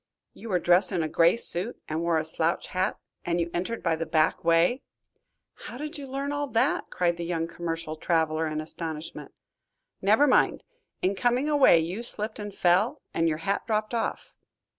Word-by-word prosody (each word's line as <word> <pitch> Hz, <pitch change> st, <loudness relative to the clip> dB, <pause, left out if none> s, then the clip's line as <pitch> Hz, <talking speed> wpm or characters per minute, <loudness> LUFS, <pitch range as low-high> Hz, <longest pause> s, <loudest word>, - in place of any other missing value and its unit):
"You 230 Hz, -, -10 dB
were 185 Hz, -, +2 dB
dressed 175 Hz, +3 st, +3 dB
in 175 Hz, -4 st, 0 dB
a -, -, -1 dB
gray 170 Hz, +6 st, +3 dB
suit 200 Hz, +1 st, -1 dB
and 155 Hz, +1 st, -2 dB
wore 170 Hz, -1 st, +1 dB
a 155 Hz, -, -1 dB
slouch 160 Hz, +2 st, -1 dB
hat, 185 Hz, 0 st, -1 dB, 0.3 s
and 175 Hz, 0 st, -1 dB
you 170 Hz, 0 st, -1 dB
entered 185 Hz, +7 st, -3 dB
by 165 Hz, -2 st, +2 dB
the 165 Hz, 0 st, -4 dB
back 155 Hz, -1 st, +1 dB
way?" 170 Hz, +9 st, +3 dB, 0.9 s
"How 240 Hz, -, -7 dB
did 300 Hz, +2 st, -6 dB
you 275 Hz, -, -7 dB
learn 275 Hz, +2 st, -3 dB
all 290 Hz, 0 st, -2 dB
that?" 230 Hz, -4 st, 0 dB
cried 175 Hz, -1 st, 0 dB
the 170 Hz, -, -4 dB
young 165 Hz, -1 st, -1 dB
commercial 165 Hz, -1 st, -5 dB
traveler 160 Hz, -1 st, 0 dB
in 155 Hz, 0 st, -3 dB
astonishment. 160 Hz, 0 st, -6 dB, 0.7 s
"Never 215 Hz, +9 st, +4 dB
mind. 265 Hz, -, +3 dB, 0.4 s
In 185 Hz, +2 st, +2 dB
coming 245 Hz, +7 st, +1 dB
away 290 Hz, -, +6 dB
you 175 Hz, +7 st, -3 dB
slipped 215 Hz, -2 st, -3 dB
and 205 Hz, 0 st, -5 dB
fell, 180 Hz, -2 st, +2 dB
and 165 Hz, 0 st, +2 dB
your 155 Hz, -, -1 dB
hat 200 Hz, -, -1 dB
dropped 215 Hz, 0 st, -1 dB
off." 230 Hz, -, -3 dB
175 Hz, 185 wpm, -27 LUFS, 165-225 Hz, 0.9 s, away